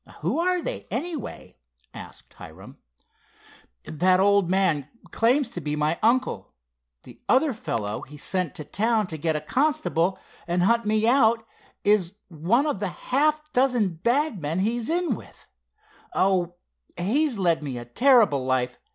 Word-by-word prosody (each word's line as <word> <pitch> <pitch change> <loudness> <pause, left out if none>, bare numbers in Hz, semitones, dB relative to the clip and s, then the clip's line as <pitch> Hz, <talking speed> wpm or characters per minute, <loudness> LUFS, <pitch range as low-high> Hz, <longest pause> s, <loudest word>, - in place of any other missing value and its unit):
"Who - - -1
are 360 0 +1
they, - - -4
anyway?" 320 -4 -5 0.4
asked - - -11
Hiram. - - -13 1.1
"That 185 +4 +2
old 200 -2 +3
man 180 -7 +1 0.2
claims 245 +2 +2
to 175 - -5
be 150 0 -2
my 150 +2 0
uncle. 230 - 0 0.5
The - - -15
other 265 +2 +3
fellow 115 - -4
he 150 +2 -11
sent 180 +4 -1
to 155 -5 -5
town 220 +4 +1
to 160 -3 -6
get 160 +1 0
a - - 0
constable, 220 - 0 0.3
and 175 +1 +1
hunt 235 +2 +2
me 215 +1 +2
out, 230 -3 +3 0.4
is 200 -3 +2 0.2
one 185 - +1
of 295 -10 -1
the 200 - -1
half 300 - 0
a 305 - -31
dozen 245 -8 +2
bad 255 - +1
men 160 +5 -1
he's 230 +3 -1
in 340 -4 +1
with. - - -12 0.7
Oh, 180 -2 +1 0.4
he's 250 - +1
led 170 -4 +1
me 135 -4 -5
a 120 - -7
terrible 215 - +4
life! 130 -1 -1
205 Hz, 150 wpm, -25 LUFS, 170-255 Hz, 1.1 s, terrible